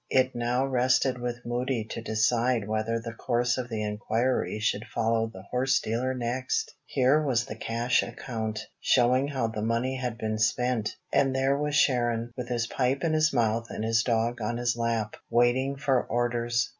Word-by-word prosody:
It 130 0 +3
now 120 +2 0
rested 130 0 +2
with 120 0 -4
Moody 120 0 -1
to - - -4
decide 115 0 +1
whether 110 +1 -1
the 115 0 -7
course 120 +2 0
of 125 -1 -4
the 110 -2 -2
inquiry 110 +3 -1
should 105 0 -1
follow 115 0 0
the 95 -4 -11
horse 130 +2 +2
dealer 125 +4 -1
next. 125 +1 -2
Here 135 +3 +3
was 125 -6 +1
the 110 - -7
cash 115 +2 +1
account, 110 -3 -4 0.2
showing 130 +2 +3
how 135 -5 -1
the 110 -1 -4
money 115 +4 0
had 125 -3 -3
been 110 -1 -2
spent. 110 +1 +1 0.2
And 135 -1 +3
there 135 +1 +2
was 150 +1 -1
Sharon, 120 -4 +2
with 125 -1 -5
his 120 -1 0
pipe 130 +2 0
in 165 -2 +1
his 155 0 +3
mouth 115 -2 +1
and 110 - -4
his 115 0 +2
dog 115 0 0
on 115 +2 -1
his 120 0 0
lap, 115 -2 -1
waiting 125 +3 +2
for 135 -2 +1
orders. 120 0 0
120 Hz, 180 wpm, -27 LUFS, 115-130 Hz, 0.2 s, It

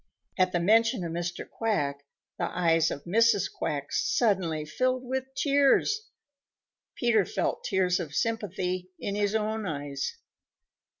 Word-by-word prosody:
At 185 -1 +2
the 175 - +1
mention 225 +4 +3
of 170 - -4
Mr. 175 +1 -4
Quack, 145 -11 -1 0.4
the - - +1
eyes 165 -2 +2
of 140 - -5
Mrs. 205 0 +3
Quack 145 -1 -3
suddenly 180 -9 +1
filled 255 +10 0
with 260 +1 -2
tears. 285 - +3 0.9
Peter 230 -4 +3
felt - - -2
tears 185 -2 +1
of 160 -4 -5
sympathy 185 -5 -2
in 200 - -3
his 205 +1 0
own 215 -1 -1
eyes. 145 -3 -4
190 Hz, 130 wpm, -28 LUFS, 170-225 Hz, 0.9 s, mention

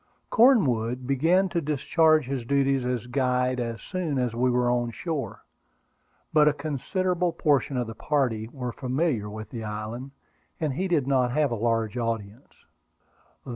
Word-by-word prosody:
Cornwood 130 - +3
began 165 +9 +3
to 170 -1 -1
discharge 155 +1 +2
his 130 -1 -3
duties 135 0 +1
as 125 -2 -2
guide 125 0 0
as 115 -1 -4
soon 175 -7 -2
as 125 -2 0
we 125 +2 +1
were 125 0 +2
on 120 -1 +1
shore; 150 +4 -5 0.9
but 150 -1 +5
a 150 - +4
considerable 175 +5 -1
portion 145 -5 +1
of 125 - 0
the 115 - -7
party 120 -5 -1
were 125 -2 -4
familiar 130 -3 -1
with 110 +1 -8
the 115 -3 -5
island, 110 +5 -5 0.5
and 155 -4 -1
he 185 +8 -1
did 160 -7 +1
not 130 -3 +1
have 150 -2 +2
a - - 0
large 115 +1 0
audience. 115 0 -5
130 Hz, 155 wpm, -26 LUFS, 120-150 Hz, 0.9 s, but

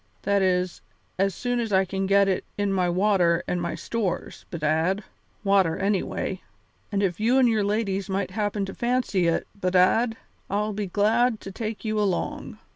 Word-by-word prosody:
That 200 0 +2
is, 180 -1 0 0.4
as 195 -2 +1
soon 245 -1 -1
as 225 -2 -2
I 190 0 +4
can 195 +1 -2
get 200 0 +4 0.3
in 205 -1 0
my 180 -2 +1
water 180 -2 +2
and 180 - -1
some 170 0 -3
stores, 210 -7 -3
bedad 165 +5 0 0.4
water 195 -5 +3
anyway. 195 -1 -1 0.5
And 200 0 0
if 180 -1 0
you 235 +5 +3
and 260 -2 +5
your 220 -3 +2
ladies 200 -1 -1
might 195 0 -1
happen 205 0 -1
to 195 - -7
fancy 240 -7 0
it, 165 - +1
bedad, 200 +5 +2 0.3
I'd 210 +1 -1
be 205 -1 -2
glad 220 +4 +2
to 195 - -7
take 220 +2 -5
you 215 0 0
along. 200 -4 -2
200 Hz, 170 wpm, -25 LUFS, 185-215 Hz, 0.5 s, and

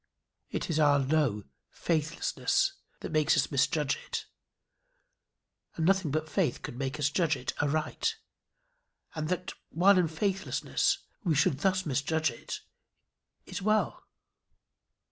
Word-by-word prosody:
It - - -3
is 155 - +1
our 145 -2 +5
low 135 -6 +1 0.3
faithlessness 165 - 0 0.3
that - - -5
makes 155 -1 +3
us - - +1
misjudge 145 +1 +1
it, - - -3 1.5
and 160 - 0
nothing 190 -3 +3
but 155 +2 -1
faith 155 -4 0
could - - -6
make 135 +3 -3
us 145 -1 +1
judge 165 -2 +2
it 125 - -4
aright. 155 - 0 1.0
And 155 0 -3
that, 180 0 -2 0.2
while 185 +4 +5
in 175 - +3
faithlessness, 190 +4 0 0.3
we 170 -6 +2
should 145 -1 +2
thus 185 +2 +1
misjudge 155 +1 +1
it, 115 - -7 0.8
is - - -6
well. 215 +2 0
155 Hz, 125 wpm, -30 LUFS, 145-180 Hz, 1.5 s, our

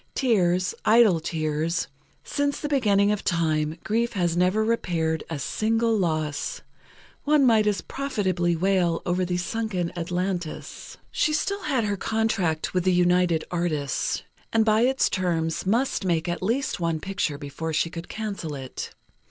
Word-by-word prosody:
Tears, 185 -8 +2
idle 220 -6 +5
tears. 160 +1 -1 0.4
Since 285 0 -1
the 295 - -3
beginning 210 -8 +3
of 210 - -2
time, 155 -2 0
grief 235 +2 0
has 175 -4 0
never 185 +5 +2
repaired 165 -8 0
a 165 - -3
single 225 - +1
loss. 155 -6 -1 0.6
One 295 -2 +4
might 220 -3 +4
as 205 -1 +1
profitably 185 -11 -1
wail 175 -1 +1
over 180 +1 +1
the 180 0 -1
sunken 185 -2 -2
Atlantis. 175 -1 -4
She 305 - +1
still 400 +6 -1
had 270 -6 +1
her 205 -1 -1
contract 195 -8 0
with 180 -1 +1
the 185 - +3
United 175 -2 +3
Artists, 160 -5 -1 0.3
and 225 -1 +3
by 215 0 +4
its 265 +2 +3
terms 170 -2 -1
must 235 +3 +1
make 170 -3 0
at 175 0 -2
least 255 +8 -1
one 165 -2 0
picture 190 -5 -2
before 145 +3 -5
she 160 +1 0
could 165 0 -7
cancel 200 -8 -4
it. 130 -2 -7
180 Hz, 150 wpm, -25 LUFS, 165-220 Hz, 0.6 s, idle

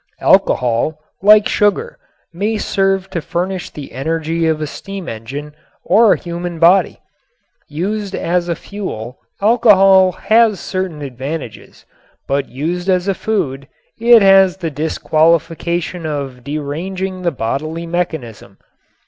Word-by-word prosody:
Alcohol, 125 +5 +2 0.2
like 210 +1 +6
sugar, 450 - 0 0.3
may 210 +5 -1
serve 195 -2 0
to 170 - -3
furnish 180 +3 -3
the 145 -2 -10
energy 160 +4 -2
of 160 -1 0
a 155 - -2
steam 195 +4 -8
engine 135 +7 -7 0.3
or 225 0 +5
a - - -1
human 175 -1 -6
body. 175 +4 +4 0.7
Used 195 +6 -3
as 175 0 -1
a 170 - 0
fuel 145 - -7 0.2
alcohol 195 -4 +5
has 220 -2 +2
certain 185 -6 -4
advantages, 135 -1 -7 0.4
but 140 +1 -1
used 170 +8 -3
as 185 0 +1
a 195 - +2
food 140 -11 -3 0.3
it 230 -1 +6
has 195 -1 +5
the 170 -4 -4
disqualification 165 +3 0
of 135 -4 -5
deranging 175 +7 -4
the 175 - +1
bodily 155 +6 -4
mechanism. 160 - -4
170 Hz, 125 wpm, -17 LUFS, 150-195 Hz, 0.7 s, like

